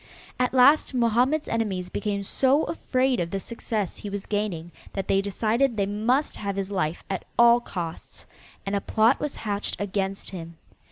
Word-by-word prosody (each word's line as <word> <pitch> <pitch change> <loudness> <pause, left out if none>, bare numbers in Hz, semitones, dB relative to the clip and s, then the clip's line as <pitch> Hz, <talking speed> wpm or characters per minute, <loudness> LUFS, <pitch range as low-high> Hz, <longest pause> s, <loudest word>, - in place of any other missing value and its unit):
At 250 - +2
last 265 +2 +5
Mohammed's 250 +6 +2
enemies 195 -6 -1
became 205 0 -2
so 270 +8 +2
afraid 260 -5 0
of 170 -1 -1
the 195 - -2
success 215 -2 -3
he 205 - -6
was 200 -1 -5
gaining 195 -6 -2 0.2
that 195 -2 -3
they 195 - +3
decided 225 +5 0
they 200 - +2
must 225 +8 0
have 200 -1 -3
his 195 0 -3
life 175 -4 -1
at 190 -2 -3
all 235 0 +7
costs, 170 -8 -7 0.4
and 200 +1 -1
a 200 - 0
plot 225 +6 +3
was 295 - -3
hatched 205 -1 -3
against 195 -1 -2
him. 170 -3 -8
205 Hz, 170 wpm, -25 LUFS, 195-240 Hz, 0.4 s, all